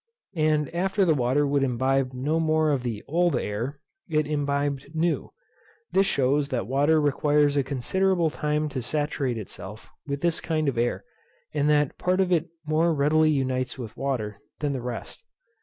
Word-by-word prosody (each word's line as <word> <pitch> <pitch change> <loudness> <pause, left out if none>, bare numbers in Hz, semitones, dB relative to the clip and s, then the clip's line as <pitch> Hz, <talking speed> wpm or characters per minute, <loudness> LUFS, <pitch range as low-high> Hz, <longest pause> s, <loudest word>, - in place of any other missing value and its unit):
And 155 -2 +1
after 190 +3 +1
the 165 - +4
water 135 +1 +2
would 140 0 +1
imbibe 130 +1 +1
no 140 +6 -1
more 155 -1 +2
of 140 -3 +1
the 115 -4 -4
old 170 0 +2
air, 120 +5 -3 0.3
it 155 -1 +2
imbibed 145 0 -2
new. 160 -1 0 0.6
This 195 +1 +3
shews 140 +1 +1
that 125 -8 -1
water 145 +6 +3
requires 145 0 +2
a 140 - +3
considerable 165 +6 +1
time 150 +1 -1
to 135 -3 -4
saturate 140 -2 -1
itself 105 0 -9 0.2
with 140 0 -3
this 170 -1 +1
kind 155 -2 -1
of 140 - +1
air, 120 +1 0 0.5
and 150 0 +1
that 150 -2 +2
part 185 +1 +1
of 185 -1 +2
it 170 -1 +2 0.2
more 160 +2 +2
readily 155 +2 +3
unites 130 -3 0
with 120 -4 -7
water 120 -7 -3 0.2
than 145 -2 -1
the 130 - -3
rest. 120 - -6
145 Hz, 170 wpm, -26 LUFS, 130-155 Hz, 0.6 s, the